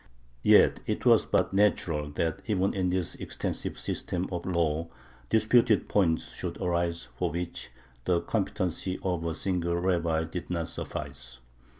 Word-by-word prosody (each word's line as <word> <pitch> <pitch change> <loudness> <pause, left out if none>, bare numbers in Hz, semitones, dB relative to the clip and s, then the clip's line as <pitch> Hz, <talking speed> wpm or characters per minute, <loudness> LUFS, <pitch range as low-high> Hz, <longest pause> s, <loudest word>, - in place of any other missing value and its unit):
Yet - - +6
it - - -2
was - - +5
but - - +1
natural 85 -7 +2
that 80 +1 -1
even 100 -3 +1
in 95 -2 0
this 90 -2 -1
extensive - - -4
system 90 +1 -2
of 90 0 -4
law 85 -2 0 0.4
disputed 110 0 +4
points 85 -6 +1
should - - -5
arise 85 -6 -1
for - - 0
which 85 -2 -5 0.4
the 90 -2 +3
competency 90 +1 -1
of 90 -3 -1
a 85 -1 -2
single 85 -3 0
rabbi 85 -2 +1
did 80 +2 -6
not 85 -2 -2
suffice. 65 -3 -6
85 Hz, 140 wpm, -28 LUFS, 80-95 Hz, 0.4 s, Yet